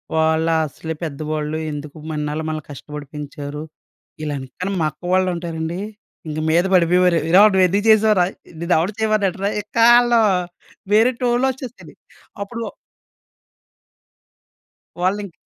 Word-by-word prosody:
వాళ్ళ 160 0 +2 0.2
అసలే 160 +3 -6
పెద్దవాళ్ళు 155 0 -3
ఎందుకు 150 0 -7 0.2
ఇన్నాళ్ళు 150 +1 -3
మనల్ని 155 -1 -4
కష్టపడి 145 +1 -8
పెంచారు. 145 0 -6 0.6
ఇలాని, 140 -3 -4
కాని 185 +2 -2
మా - - +2
అక్క 150 - -37
వాళ్ళుంటారండి. 175 -2 -1 0.5
ఇంక 155 0 -4
మీద 170 +2 +4
పడిపోయేవారు. 180 0 +4
"ఏరా! 185 +4 +7
నువ్వేందుకు 190 +2 +3
చేసావురా? 215 -4 +5 0.4
నిన్నెవడు 170 +3 +1
చేయమన్నాడురా?" 205 -3 +1
ఇక్కాళ్ళు 235 +2 +5 0.7
వేరే 225 +4 +5
టోన్‌లోచ్చేస్తది. 250 0 -2 0.5
అప్పుడు 230 +3 -6 2.4
వాళ్ళింకా 190 +1 -1
175 Hz, 100 wpm, -20 LUFS, 155-205 Hz, 2.4 s, ఏరా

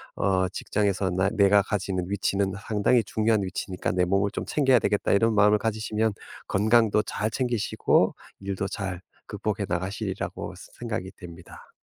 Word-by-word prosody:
어 95 -1 +1
'직장에서 100 -1 -1
나 95 +2 +1
내가 100 0 +5
가지는 95 -3 -2
위치는 100 0 0
상당히 110 +2 +3
중요한 110 0 +1
위치니까 95 0 -3
내 90 0 +1
몸을 100 +2 +1
좀 - - -4
챙겨야 135 -5 +3
되겠다.' 105 - 0
이런 110 +2 +3
마음을 105 +1 +5
가지시면 110 0 -1 0.3
건강도 110 +1 +3
잘 105 +2 -2
챙기시고 120 -4 +1 0.3
일도 95 0 -3
잘 95 -3 -4 0.3
극복해 105 -1 -3
나가시리라고 95 +2 -3 0.3
생각이 110 -5 -4
됩니다. 85 0 -12
100 Hz, 350 characters per minute, -26 LUFS, 95-110 Hz, 0.3 s, 내가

